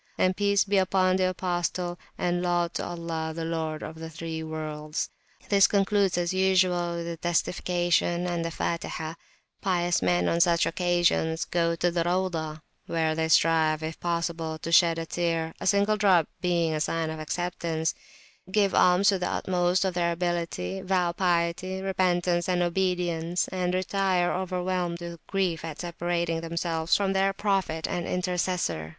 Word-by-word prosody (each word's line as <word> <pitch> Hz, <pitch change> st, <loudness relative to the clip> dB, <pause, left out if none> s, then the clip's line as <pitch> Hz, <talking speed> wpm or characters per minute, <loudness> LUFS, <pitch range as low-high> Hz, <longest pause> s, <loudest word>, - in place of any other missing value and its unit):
and 185 Hz, 0 st, +2 dB
Peace 200 Hz, 0 st, +3 dB
be 200 Hz, 0 st, +2 dB
upon 185 Hz, 0 st, +2 dB
the 185 Hz, -1 st, +2 dB
Apostle, 175 Hz, -1 st, -2 dB, 0.2 s
and 175 Hz, 0 st, 0 dB
Laud 175 Hz, -1 st, 0 dB
to -, -, -2 dB
Allah, 165 Hz, -2 st, -4 dB
the 165 Hz, -1 st, -3 dB
Lord 160 Hz, -2 st, -3 dB
of 160 Hz, +1 st, -8 dB
the 160 Hz, 0 st, -6 dB
(three) 160 Hz, 0 st, -5 dB
Worlds. 155 Hz, -1 st, -4 dB, 0.4 s
This 200 Hz, -1 st, +6 dB
concludes, 200 Hz, -2 st, +2 dB
as 175 Hz, 0 st, 0 dB
usual, 185 Hz, -2 st, +2 dB
with 170 Hz, 0 st, -4 dB
the 170 Hz, 0 st, -5 dB
Testification 175 Hz, +1 st, 0 dB
and 175 Hz, -1 st, -1 dB
the 165 Hz, -, -2 dB
Fatihah. 165 Hz, -1 st, -3 dB, 0.5 s
Pious 175 Hz, -2 st, +1 dB
men 90 Hz, -1 st, +2 dB
on 170 Hz, -, +2 dB
such 170 Hz, -1 st, +4 dB
an -, -, +1 dB
occasion 175 Hz, -2 st, +1 dB
go 170 Hz, -1 st, +1 dB
to 175 Hz, +1 st, +1 dB
the 170 Hz, 0 st, 0 dB
Rauzah, 165 Hz, -3 st, -2 dB, 0.2 s
where 160 Hz, -1 st, 0 dB
they 160 Hz, 0 st, 0 dB
strive, 160 Hz, -1 st, +3 dB
if 160 Hz, 0 st, -5 dB
possible, 170 Hz, -2 st, -2 dB
to 165 Hz, -, -6 dB
shed 170 Hz, -1 st, +5 dB
a 165 Hz, -, -3 dB
tear,a 165 Hz, 0 st, -2 dB
single 200 Hz, +2 st, +3 dB
drop 185 Hz, -6 st, +4 dB
being 170 Hz, -3 st, +1 dB
a 155 Hz, -, -2 dB
sign 165 Hz, 0 st, -1 dB
of 160 Hz, -, -6 dB
acceptance, 165 Hz, 0 st, -2 dB, 0.6 s
give 200 Hz, -1 st, +2 dB
alms 180 Hz, +2 st, +5 dB
to 195 Hz, -2 st, +2 dB
the 180 Hz, -, -1 dB
utmost 180 Hz, 0 st, +1 dB
of 190 Hz, -, 0 dB
their 170 Hz, -1 st, +1 dB
ability, 175 Hz, -, -2 dB
vow 185 Hz, -2 st, +1 dB
piety, 175 Hz, +1 st, 0 dB
repentance, 180 Hz, -2 st, +1 dB
and 180 Hz, -1 st, +2 dB
obedience, 175 Hz, -1 st, 0 dB
and 180 Hz, -1 st, -1 dB
retire 185 Hz, -1 st, +1 dB
overwhelmed 180 Hz, -1 st, -2 dB
with 170 Hz, -1 st, -7 dB
grief, 185 Hz, -5 st, -1 dB
at 160 Hz, -2 st, -6 dB
separating 170 Hz, -1 st, -2 dB
themselves 165 Hz, -1 st, 0 dB
from 195 Hz, -1 st, 0 dB
their 195 Hz, 0 st, +2 dB
Prophet 190 Hz, -6 st, -1 dB
and 175 Hz, -, -3 dB
Intercessor. 180 Hz, -, -1 dB
175 Hz, 160 wpm, -27 LUFS, 165-185 Hz, 0.6 s, This